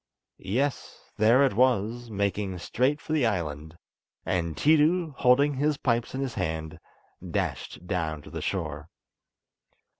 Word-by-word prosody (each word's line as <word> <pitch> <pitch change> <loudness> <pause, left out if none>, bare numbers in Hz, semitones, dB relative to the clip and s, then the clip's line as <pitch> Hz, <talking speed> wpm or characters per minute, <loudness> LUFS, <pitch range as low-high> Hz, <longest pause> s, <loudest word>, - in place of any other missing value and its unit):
Yes! 125 +9 -3
there 115 +6 +5
it 135 - +2
was, 120 0 +1
making 100 -2 -2
straight 130 +11 0
for 155 - -5
the 145 -7 +3
island; 80 -5 -3 0.5
and 85 -3 -1
Tiidu, 160 +2 +3
holding 140 +3 +4
his 145 +2 0
pipes 120 -1 -1
in 135 - -2
his 135 -3 -3
hand, 80 +1 -3 0.5
dashed - - -3
down 80 -5 -2
to - - -12
the - - -5
shore. 80 -5 -3
110 Hz, 130 wpm, -27 LUFS, 85-135 Hz, 0.5 s, there